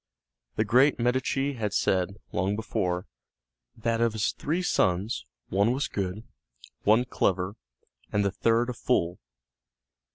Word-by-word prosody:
The 110 - +1
great 130 +6 +4
Medici 130 +3 0
had 110 -5 -2
said, 95 +1 +1 0.2
long 95 +3 0
before, 95 -5 -1 0.7
that 115 0 0
of 115 -2 +2
his 110 -2 0
three 165 +5 -2
sons 95 - +1 0.2
one 100 +5 +3
was 135 +2 -1
good, 100 +2 -3 0.6
one 110 +4 +4
clever, 95 -4 0 0.6
and 105 -1 +1
the 100 - +1
third 115 +5 +2
a - - -5
fool. 90 -8 0
110 Hz, 130 wpm, -27 LUFS, 95-120 Hz, 0.7 s, great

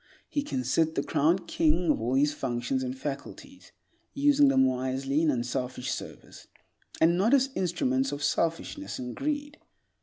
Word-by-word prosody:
He 290 - -1
can 130 - -3
sit 160 +6 +1
the 140 - 0
crowned 170 +5 +1
king 165 +1 +2
of - - -1
all 120 +3 0
his 145 +2 +3
functions 125 0 -2
and 130 0 -4
faculties, 145 - -8 0.4
using 285 0 +4
them 130 - +4
wisely 130 +3 0
in 165 - +2
unselfish 125 0 -2
service, - - -8 0.5
and 170 +2 +4
not 225 +8 +4
as 270 0 +2
instruments 135 -7 0
of 145 0 -5
selfishness 165 - -1
and 125 -1 -6
greed. 290 0 -3
145 Hz, 155 wpm, -28 LUFS, 130-190 Hz, 0.5 s, using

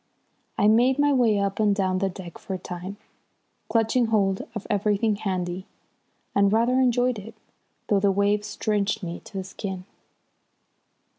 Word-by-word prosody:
I 205 - +4
made 245 +5 +4
my 290 0 +3
way 235 -5 +3
up 200 0 -1
and 210 -2 +3
down 185 -2 0
the 195 0 +1
deck 180 -2 -9
for 190 - -5
a - - -3
time, 180 +2 -7 0.7
clutching 230 +1 +2
hold 195 -3 +1
of 215 - -5
everything 210 +1 +1
handy, 185 -1 -3 0.7
and 200 0 +4
rather 235 +4 +3
enjoyed 250 -2 +2
it, 215 +3 -11 0.5
though 205 - +2
the 200 0 +3
waves 205 +2 0
drenched 210 -1 0
me 175 0 -4
to 195 - -9
the 190 - -2
skin. 190 -1 -6
205 Hz, 155 wpm, -25 LUFS, 190-225 Hz, 0.7 s, I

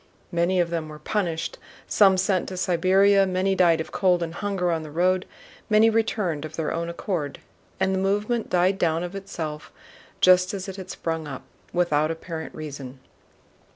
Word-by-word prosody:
Many 175 +2 +1
of 170 -1 +1
them 165 -2 -3
were 150 - -9
punished, 165 0 -2 0.3
some 195 -2 +5
sent 185 -1 +1
to 185 - -6
Siberia, 190 +2 +4
many 185 +1 +1
died 175 -3 +4
of 160 - -5
cold 180 -3 +2
and 165 -1 -5
hunger 195 -3 -1
on 165 -1 -1
the 155 - -8
road, 180 +4 +1 0.4
many 220 +1 +5
returned 210 -8 0
of 155 0 -7
their 160 - -2
own 170 +1 -2
accord, 170 -4 -3 0.4
and 190 0 +1
the 190 - 0
movement 210 +4 0
died 185 +2 +2
down 165 0 +1
of 180 +1 -5
itself 165 -6 -6 0.5
just 185 +1 +5
as 190 0 -5
it 190 0 -7
had 185 -1 -8
sprung 165 -2 -3
up, 135 -2 -7 0.3
without 155 -4 +2
apparent 165 0 -6
reason. 140 -4 -7
180 Hz, 175 wpm, -25 LUFS, 160-195 Hz, 0.5 s, some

